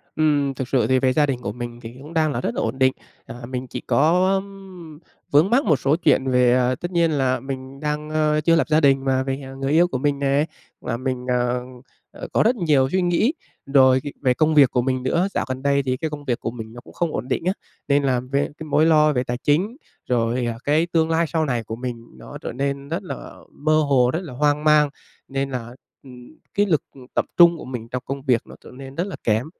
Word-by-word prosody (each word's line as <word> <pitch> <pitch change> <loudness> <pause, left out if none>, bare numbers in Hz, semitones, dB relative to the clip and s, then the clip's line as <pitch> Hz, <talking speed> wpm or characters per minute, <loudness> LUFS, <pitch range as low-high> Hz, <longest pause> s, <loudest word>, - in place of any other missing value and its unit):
Ừm, 145 -3 +2
thực 130 -1 -5
sự 125 -5 +1
thì 130 0 +3
về 130 -1 +2
gia 150 +2 +3
đình 135 -4 -2
của 100 - -3
mình 120 +1 -7
thì 115 +2 -9
cũng 150 +4 -11
đang 155 -2 +2
là 120 - -3
rất 115 - -3
là - - -1
ổn 115 +4 -3
định. 130 0 +4 0.3
À, 115 - -9
mình 130 0 -4
chỉ - - -6
có, 180 +6 +3
ừm, 190 -5 -7 0.3
vướng 150 +7 +4
mắc 260 +4 +3
một 155 - +4
số 140 +4 +2
chuyện 150 -6 +2
về, 125 -1 +4
à, 125 0 +2
tất 175 +6 -6
nhiên 170 -2 +2
là 130 -3 +1
mình 135 +1 -7
đang, 150 0 -3
ơ, 155 -1 +1
chưa 165 +2 +3
lập 165 - +1
gia 155 0 +4
đình, 135 -1 +3
mà 130 0 +1
về, 135 +1 -3
à, 135 0 -9
người 135 +1 -3
yêu 170 +3 +5
của 130 - -3
mình 140 +1 0
nè, 140 +2 +2 0.4
và 115 - -3
mình, 130 0 -3
à, 125 0 +1 0.5
à, - - -15
có - - +3
rất 240 +3 +3
nhiều 150 - +2
suy 185 - +1
nghĩ 180 - +2 0.3
rồi, 130 -2 +4
ờ, 145 - -5
về 130 -2 +3
công 155 +2 +1
việc 140 -4 +6
của 125 - +1
mình 130 0 -1
nữa. 170 +8 +1
Dạo - - -1
gần 130 0 -4
đây 140 0 +2
thì 130 -1 -1
cái 160 +3 -3
công 145 -1 -8
việc 120 -3 -1
của 115 - -4
mình 115 -1 -9
nó 120 - -10
cũng - - -16
không 170 -3 -1
ổn 120 - -4
định 140 - -1
á, 185 - +2 0.3
nên 140 0 +3
làm 125 -2 0
về 140 +1 +1 0.2
cái 160 - -8
mối 150 +1 +2
lo 155 -2 +4
về 125 -2 0
tài 120 0 -3
chính, 180 - 0 0.3
rồi, 120 0 +1
à, 115 -1 -2
cái 155 +3 +2
tương 165 -1 +1
lai 165 +1 +2
sau 160 -1 0
này 120 -4 -1
của 110 +1 -6
mình 120 -1 -6
nó - - -10
trở - - -5
nên 140 +2 -3
rất 170 +5 -3
là 180 - -8 0.2
mơ 155 +2 0
hồ, 135 -4 +3
rất 160 - 0
là 150 - -8
hoang 150 +2 +1
mang. 150 -1 +5 0.4
Nên 135 0 -2
là, 120 -3 -4 0.3
ừm, 125 +2 -14 0.2
cái 205 +1 +2
lực, 160 -7 +1
ừm, 130 -2 -13
tập - - +1
trung 170 -1 +7
của - - -9
mình 120 -3 -6
trong 125 0 -4
công 135 0 -5
việc 125 -4 +2
nó - - -12
trở - - -13
nên 135 +1 -10
rất 170 - 0
là 195 - -6
kém. 110 +3 +1
140 Hz, 255 wpm, -22 LUFS, 125-155 Hz, 0.5 s, trung